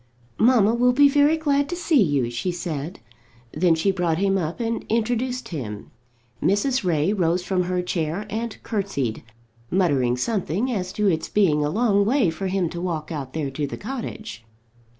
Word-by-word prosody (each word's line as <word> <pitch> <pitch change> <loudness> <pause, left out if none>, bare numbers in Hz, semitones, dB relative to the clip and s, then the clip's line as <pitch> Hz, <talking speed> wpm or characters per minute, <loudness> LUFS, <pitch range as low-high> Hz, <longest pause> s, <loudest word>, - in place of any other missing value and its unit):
"Mamma 225 -2 +5
will 245 +1 +3
be 285 +3 +6
very 290 +3 +4
glad 285 -2 +1
to 350 - -2
see 330 -6 +3
you," 140 - +1
she 120 +10 -2
said. 170 -2 -5 0.5
Then 170 +1 +3
she 180 +5 +1
brought 175 -4 0
him 195 +1 +1
up 170 0 -2
and 230 -1 -2
introduced 240 +2 -1
him. 110 - -6 0.5
Mrs. 225 +7 +1
Ray 170 +1 +1
rose 175 -2 +1
from 180 -1 0
her 180 0 -1
chair 175 +2 -2
and 220 +2 -4
curtseyed, 195 - -2 0.5
muttering 140 -10 +2
something 210 - -1
as 185 -5 -2
to 210 -1 +1
its 160 -4 0
being 160 -8 +3
a 145 - 0
long 205 +1 +2
way 225 - +2
for 175 +4 -4
him 185 -2 0
to 175 - -5
walk 165 -3 -3
out 140 -5 -5
there 150 -4 -2
to 145 +2 -2
the - - -6
cottage. 220 - -6
190 Hz, 175 wpm, -23 LUFS, 160-230 Hz, 0.5 s, be